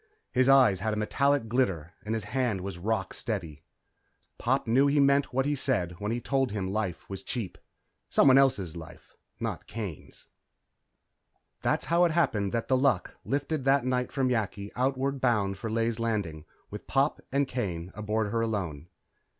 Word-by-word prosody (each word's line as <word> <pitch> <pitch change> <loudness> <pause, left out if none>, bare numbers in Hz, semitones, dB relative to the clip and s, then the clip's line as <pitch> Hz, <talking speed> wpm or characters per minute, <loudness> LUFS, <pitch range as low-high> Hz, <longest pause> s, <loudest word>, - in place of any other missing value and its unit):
His 130 +1 +3
eyes 130 -9 +6
had 110 +2 -1
a - - -4
metallic 140 +4 +1
glitter 95 -9 0
and 110 +1 -2
his 110 - -3
hand 110 -2 -1
was 95 -2 -6
rock 95 0 -1
steady. 85 -10 -4 0.8
Pop 135 +3 +1
knew 130 +5 +4
he 145 +1 +3
meant 140 0 +3
what 135 +1 +1
he 145 - +1
said 125 -10 0
when 105 +1 -2
he 120 - -1
told 135 0 0
him 95 -2 -3
life 100 -6 -3
was 95 - -6
cheap. 120 -7 -4 0.5
Someone 130 -2 +6
else's 105 - +3
life, 80 -1 -11 0.2
not - - -4
Kane's. 105 -9 -7 1.4
That's - - 0
how 170 +1 +3
it 170 - +1
happened 105 - +1
that 115 -1 -2
The 130 - +3
Luck 135 +1 +1
lifted 145 +1 -1
that 135 -1 +3
night 125 -1 0
from 130 -2 +1
Yakki, 105 -4 -2
outward 135 +1 0
bound 100 -6 +1
for 115 - -4
Ley's 115 +1 0
Landing, 100 -9 -2 0.3
with - - -8
Pop - - +1
and 140 +1 +2
Kane 90 -9 -3
aboard 105 0 -1
her 115 0 0
alone. 90 -9 -3
115 Hz, 170 wpm, -28 LUFS, 100-135 Hz, 1.4 s, eyes